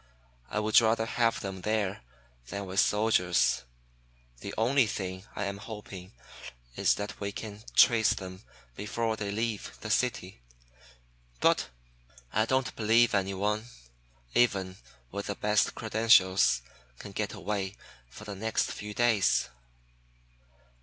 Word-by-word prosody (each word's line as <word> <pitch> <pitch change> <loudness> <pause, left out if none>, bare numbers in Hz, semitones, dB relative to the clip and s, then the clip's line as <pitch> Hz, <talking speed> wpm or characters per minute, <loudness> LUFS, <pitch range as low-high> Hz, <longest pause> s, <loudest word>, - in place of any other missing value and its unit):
I - - -4
would 110 +3 +5
rather 110 0 +2
have 115 0 +1
them 95 -1 -5
there 105 - -1 0.5
than 100 0 -5
with 95 +1 -1
soldiers. 90 - +2 0.7
The - - -6
only 125 +2 +3
thing 95 -2 -5
I 100 - -2
am 100 0 -4
hoping 100 -4 -9 0.6
is - - +3
that 105 +1 -6
we 100 -1 -3
can 105 0 -8
trace 110 -3 +6
them 95 -1 -8 0.3
before 110 +2 -2
they 105 -2 -4
leave 110 0 -3
the 105 - -4
city. 105 - -1 1.0
But - - +2 0.6
I 110 +1 +3
don't 130 0 0
believe 115 +2 +4
anyone, 100 +2 0 0.7
even 95 -6 +2 0.3
with 100 +1 -5
the 100 - -2
best 105 0 +1
credentials, 100 - +4 0.3
can - - -9
get - - -3
away 100 -1 -3 0.3
for 65 - -12
the 105 -1 -6
next 110 +3 -1
few 105 0 -7
days." 115 -5 +3
105 Hz, 125 wpm, -29 LUFS, 95-110 Hz, 1.0 s, trace